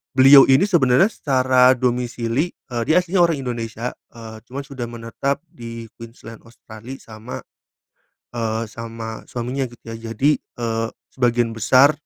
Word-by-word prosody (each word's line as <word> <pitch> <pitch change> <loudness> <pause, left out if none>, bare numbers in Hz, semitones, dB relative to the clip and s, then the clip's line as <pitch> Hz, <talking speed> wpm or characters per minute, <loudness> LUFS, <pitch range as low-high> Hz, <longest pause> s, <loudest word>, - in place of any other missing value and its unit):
beliau 135 +1 +9
ini 135 +8 +6
sebenarnya 155 +1 +4
secara 130 -2 +3
domisili, 125 +4 -1 0.2
eee, 120 -1 -2
dia 165 - +5
aslinya 180 +1 0
orang 165 -3 +2
Indonesia, 120 -1 -4 0.2
eee, 110 -1 -10
cuma 140 +2 -5
sudah 135 -4 -6
menetap 120 +6 -3
di 115 -2 -9
Queensland, 115 -1 -11
Australia 115 +2 -11
sama, 110 +2 -9 1.0
eee, 115 0 -1
sama 115 0 -7
suaminya, 125 +3 -3
gitu 120 - -18
ya. - - -5 0.2
Jadi, 145 +7 +2
eee, 115 -1 -3 0.2
sebagian 120 -2 +1
besar, 130 +7 +5
120 Hz, 135 wpm, -21 LUFS, 115-135 Hz, 1.0 s, beliau